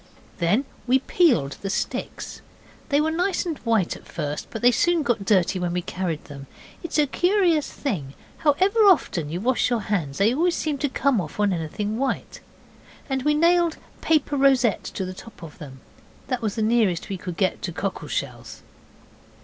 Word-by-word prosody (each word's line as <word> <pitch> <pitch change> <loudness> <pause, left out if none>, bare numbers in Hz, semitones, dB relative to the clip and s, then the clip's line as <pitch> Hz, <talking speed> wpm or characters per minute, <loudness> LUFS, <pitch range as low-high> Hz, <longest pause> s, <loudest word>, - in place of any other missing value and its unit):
Then 200 +11 +2 0.2
we 255 +2 +5
peeled 255 - +2
the 195 - -3
sticks. - - -4 0.5
They 285 -1 +3
were 315 +1 +1
nice 360 +4 0
and 325 -4 -3
white 225 -7 +1
at - - -14
first, 145 0 -4
but 225 - -7
they 245 - +7
soon 345 +5 +2
got 230 -6 0
dirty 190 -2 +2
when 175 -1 -1
we 180 0 -1
carried 175 -5 -3
them. 140 -2 -10 0.3
It 340 - -6
is - - +1
a 300 - +5
curious 355 0 +2
thing: 155 - -4 0.2
however 375 +9 +2
often 180 - +3
you 170 +3 -3
wash 250 +5 +1
your 240 -3 0
hands 170 -10 -2
they 215 +4 +3
always 340 +5 +2
seem 300 -3 -2
to 285 - 0
come 260 -4 +1
off 155 +4 -8
on 205 -2 +3
anything 205 +7 -3
white. 270 0 -2 0.7
And 265 0 0
we 300 +3 +2
nailed 340 +1 +3 0.2
paper 300 -2 +2
rosettes 265 -5 +3
to 190 - -4
the 185 - -5
tops 210 0 -13
of 155 -3 -11
them. 135 -4 -10 0.5
That 255 -2 -1
was 215 -3 -2
the 220 - 0
nearest 215 -6 +2
we 195 - -3
could 180 -2 -7
get 190 - 0
to 175 - -3
cockle 195 +3 -4
shells. - - -5
225 Hz, 190 wpm, -24 LUFS, 180-295 Hz, 0.7 s, they